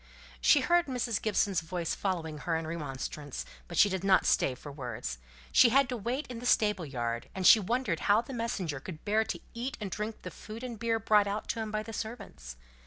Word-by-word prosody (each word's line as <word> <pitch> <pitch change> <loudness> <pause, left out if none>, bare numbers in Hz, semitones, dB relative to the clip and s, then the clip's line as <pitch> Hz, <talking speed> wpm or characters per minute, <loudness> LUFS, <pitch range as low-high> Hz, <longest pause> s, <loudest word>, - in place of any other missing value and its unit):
She 60 - +6
heard 345 -1 +3
Mrs. 245 -4 -1
Gibson's 200 -4 +1
voice 170 0 -3
following 165 -6 -3
her 165 +2 -1
in 160 0 -2
remonstrance, 145 -3 -5 0.2
but - - -6
she - - +7
did 190 -2 -2
not 195 -1 +4
stay 130 - +2
for 145 +3 -10
words. 120 - -5 0.3
She 235 - +7
had 275 +2 +4
to 250 - -2
wait 245 +6 -2
in 245 -3 -7
the 245 - -3
stable 210 -8 +2
yard, 120 -3 -3
and 190 -1 -2
she 225 - +9
wondered 215 -4 -1
how 210 +2 +4
the 265 - -9
messenger 200 - -2
could 160 +4 -9
bear 215 +1 +3
to - - -4
eat 245 +3 -4
and 205 -3 -5
drink 210 +3 -4
the - - -6
food 220 +3 -9
and 240 -4 -6
beer 230 0 +1
brought 210 -2 +3
out 205 +2 -3
to 230 - -1
him 220 -1 -3
by 215 0 -2
the 225 +1 -8
servants. 215 - -7
205 Hz, 220 wpm, -30 LUFS, 160-230 Hz, 0.3 s, she